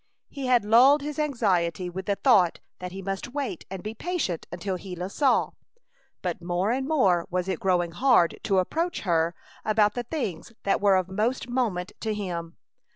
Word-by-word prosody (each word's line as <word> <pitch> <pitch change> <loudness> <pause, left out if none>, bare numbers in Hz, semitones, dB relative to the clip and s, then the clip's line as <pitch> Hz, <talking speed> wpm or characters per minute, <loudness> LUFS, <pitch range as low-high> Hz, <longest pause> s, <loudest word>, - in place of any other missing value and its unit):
He 275 -3 -4
had 245 -4 +3
lulled 260 +7 +6
his 300 +1 -4
anxiety 185 - 0
with 185 +2 -6
the 200 - +2
thought 195 -9 +4 0.2
that 180 0 -6
he 190 +1 -7
must 195 +7 -4
wait 275 - -4
and 190 -1 -6
be 215 - -4
patient 275 - -3
until 185 +2 -3
Gila 180 0 -6
saw. 275 +3 +2 0.7
But 175 -2 -3
more 175 +4 0
and 265 +2 -1
more 195 - +2
was 180 0 -1
it 185 -4 -2
growing 175 -3 +1
hard 205 -3 +3
to 195 -3 +2
approach 330 - 0
her 170 -2 +1 0.3
about 210 -1 +3
the 245 - -2
things 230 - -4
that 200 - +1
were 200 -1 +5
of 185 -1 +1
most 220 +6 -1
moment 220 -8 -1
to 220 -1 -2
him. 170 -4 -5
195 Hz, 180 wpm, -26 LUFS, 180-245 Hz, 0.7 s, lulled